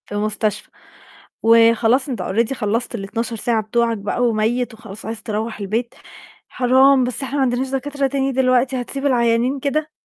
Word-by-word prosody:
في - - -23
المستشفى، 210 0 -2 0.7
وخلاص 230 +3 +4
أنت 250 - -3
already 225 +6 0
خلّصت 230 0 -2
ال12 230 +3 -4
ساعة 225 0 0
بتوعك 230 +1 0
بقى، 205 +4 -2
وميت 235 +2 0
وخلاص 220 -2 -10
عايز 225 0 -5
تروّح 220 0 -4
البيت، 225 +5 -3 0.5
"حرام، 260 +1 +4
بس 250 +2 -2
إحنا 270 +1 -4
ما 285 - +1
عندناش 260 0 0
دكاترة 275 +1 -2
تاني 270 0 -1
دلوقتي، 255 0 +1
هتسيب 275 +3 -5
العيانين 245 0 +2
كده؟!" 300 +3 -1
240 Hz, 155 wpm, -20 LUFS, 225-265 Hz, 0.7 s, وخلاص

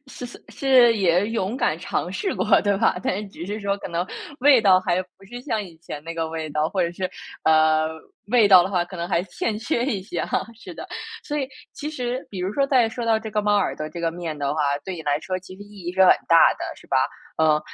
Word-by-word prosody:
是 255 - -9
是 240 - -13
是 250 -4 +4
也 185 0 +2
勇 225 0 -2
敢 155 - +1
尝 175 0 -3
试 385 - -2
过 - - -1 0.2
对 205 -1 +2
吧， 225 - +2
但 - - 0
是 210 -1 -6
只 170 - -9
是 210 +2 -4
说 200 0 -1
可 - - -7
能 175 +1 -2 0.3
味 275 -2 +6
道 185 -2 +6
还 185 0 0
不 185 +2 -22
是 245 0 -7
像 225 -6 -1
以 170 -4 -12
前 150 -2 -8
那 165 0 -6
个 165 -1 -2
味 160 -1 -4
道， 150 +1 0
或 190 0 0
者 170 - 0
是， 185 +1 -3 0.3
呃 155 0 +4 0.4
味 230 -3 +5
道 185 -3 +9
的 190 - -3
话 180 -3 +1
可 180 +1 -10
能 170 0 -3
还 170 -2 +1
欠 210 +4 -3
缺 235 +1 -1
一 230 -8 -1
些 205 - -4
啊， - - -4 0.3
是 - - -10
的。 - - -8 0.4
所 295 - -3
以 270 - -1 0.3
其 300 +1 -5
实 250 -2 -4
比 195 - -7
如 185 - -1
说 275 -1 +2
在 255 -4 +3
说 235 +1 -5
到 220 -1 +3
这 220 -1 -7
个 210 0 0
猫 205 0 +3
耳 - - 0
朵 155 - -4
这 170 - -7
个 165 -1 0
面 165 -3 -6
的 140 0 -1
话， 155 - -1 0.2
对 190 - -4
你 160 - -7
来 145 0 0
说 185 +5 -3
其 185 0 -12
实 - - -18
意 205 -1 -13
义 175 - -3
是 190 0 +3
很 - - +8 0.2
大 165 -1 +7
的， - - -6
是 - - -17
吧？ - - 0 0.4
嗯， 155 -1 +4
190 Hz, 280 characters per minute, -23 LUFS, 170-225 Hz, 0.4 s, 道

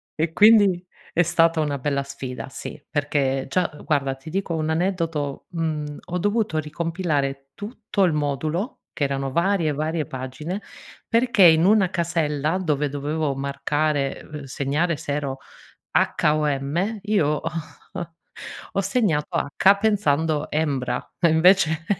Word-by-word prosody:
e 160 +1 0
quindi 205 -3 +5 0.3
è 175 - +4
stata 165 0 +3
una 145 -2 -1
bella 140 0 -1
sfida, 135 -1 -7
sì, 150 - -7
perché 140 -3 0
già 180 +4 +1
guarda 140 -3 +1
ti 135 +4 -11
dico 190 0 -2
un 155 0 -1
aneddoto, 165 -4 -1
mhmm, 155 -4 -3
ho 180 - -3
dovuto 205 -2 0
ricompilare 150 -3 -2
tutto 210 -1 -2
il 175 -4 +3
modulo, 150 - -2
che 145 - 0
erano 135 -1 -2
varie 170 0 +1
e 150 - 0
varie 155 +1 -1
pagine, 130 +10 -5 0.5
perché 235 -2 +2
in 160 0 +7
una 200 -2 +4
casella 165 -2 0
dove 150 -5 0
dovevo 145 +1 -2
marcare, 140 +1 -1
uhm, 150 -2 -6
segnare 145 +5 -1
se 145 - -4
ero 140 -2 -3 0.5
H - - +2
o 155 0 0
M, 155 +10 -1
io 205 -7 +2
ho 150 - -1 1.3
ho 195 - +1
segnato 195 -7 0
H, 190 +7 +3
pensando 160 -8 +1
hembra, 135 -5 -1
e 170 -2 +4
invece 160 0 +4
155 Hz, 140 wpm, -23 LUFS, 145-180 Hz, 1.3 s, in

